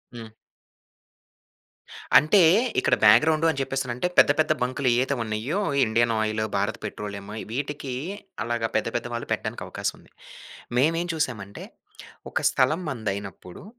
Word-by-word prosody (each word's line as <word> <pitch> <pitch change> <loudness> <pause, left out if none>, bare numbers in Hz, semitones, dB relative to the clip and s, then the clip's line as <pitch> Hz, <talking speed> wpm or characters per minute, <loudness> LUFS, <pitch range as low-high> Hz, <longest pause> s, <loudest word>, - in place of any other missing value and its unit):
హ్మ్. 115 -1 -8 1.9
అంటే 170 +6 +5 0.4
ఇక్కడ - - +2
బ్యాక్‌గ్రౌండ్ 150 +9 +5
అని 140 - -6
చెప్పేసి 135 0 -2
అనంటే 120 +8 -2
పెద్ద - - +7
పెద్ద 155 - +3
బంక్‌లు 130 +2 -2
ఏవైతే 130 +3 +1
ఉన్నాయో. 115 - -2 0.3
Indian 115 +1 +1
oil, 110 0 -1
Bharat 100 +3 -1
petroleum. 100 -1 -6 0.2
వీటికి 140 +1 -4 0.5
అలాగా 115 -1 -2
పెద్ద 110 - +1
పెద్ద 120 - -5
వాళ్ళు 120 - -4
పెట్టడానికి - - -3
అవకాశం - - -3
ఉంది. - - -22 0.7
మేమేం 165 +6 +2
చూసామంటే, 105 -10 -4 0.7
ఒక - - 0
స్థలం 145 +7 +1
మనదయినప్పుడు 100 -7 -6
120 Hz, 125 wpm, -25 LUFS, 110-140 Hz, 1.9 s, పెద్ద